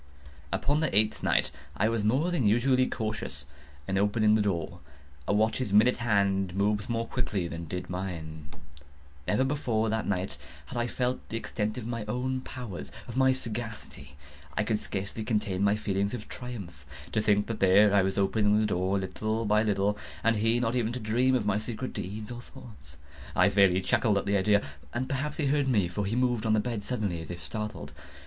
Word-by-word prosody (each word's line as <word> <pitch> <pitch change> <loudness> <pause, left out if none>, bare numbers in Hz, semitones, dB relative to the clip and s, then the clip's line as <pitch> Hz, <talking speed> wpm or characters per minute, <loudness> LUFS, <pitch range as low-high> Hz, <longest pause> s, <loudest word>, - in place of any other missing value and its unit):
Upon 145 +2 +1
the 155 -11 +1
eighth 110 0 +3
night - - +2 0.3
I 105 - +3
was 115 -2 0
more 135 +11 +2
than 135 -11 +2
usually 130 +4 +3
cautious 110 - -4 0.4
in 95 0 +1
opening 105 +1 +3
the 110 - +4
door. 90 -3 -2 0.5
A - - +2
watch's 110 +2 +1
minute 110 +5 +5
hand 100 -5 +1
moves 105 +2 +1
more 115 -1 0
quickly 105 -8 -2
than 85 0 -6
did 90 +3 -5
mine. 80 -5 -5 0.8
Never 115 +5 +2
before 120 -6 0
that 110 -1 -1
night 95 -6 -2 0.3
had 75 - -10
I 120 0 0
felt 125 +1 -2
the 115 - -2
extent 110 -1 -3
of 120 - -5
my 115 -1 -3
own 130 +4 -2
powers—of 120 -1 -8
my 130 0 +5
sagacity. 115 - -5 0.4
I 110 - +3
could 105 0 0
scarcely 100 +2 -4
contain 105 -4 0
my 100 +1 +4
feelings 100 0 -1
of 110 -3 -8
triumph. 100 - -8 0.3
To 110 - +1
think 105 -1 +3
that 115 -2 -4
there 100 +2 +6
I 100 - +6
was, 95 0 -1
opening 105 +1 +3
the 110 - +2
door, 95 -1 +1
little 110 +4 -2
by 105 +1 +3
little, 105 -1 +1 0.2
and 115 -1 +3
he 115 +3 +2
not 120 0 0
even 120 -2 0
to 125 - -3
dream 120 +4 +2
of 120 - 0
my 105 0 +2
secret 120 +3 -5
deeds 105 +5 -5
or 120 0 -6
thoughts. 100 - -12 0.4
I - - +5
fairly 95 -2 +4
chuckled 100 +2 +2
at 100 - -1
the 100 0 +2
idea; 100 +1 +3 0.3
and 130 +2 -1
perhaps 145 +3 -2
he 155 - 0
heard 140 0 +2
me; 105 -8 +3
for 100 +3 -3
he 110 - -1
moved 120 -3 +1
on 110 - +3
the 110 - +4
bed 115 -1 -2
suddenly, 100 -7 -2
as 80 - -9
if 85 -1 -7
startled. 105 -4 -5
105 Hz, 195 wpm, -29 LUFS, 100-120 Hz, 0.8 s, there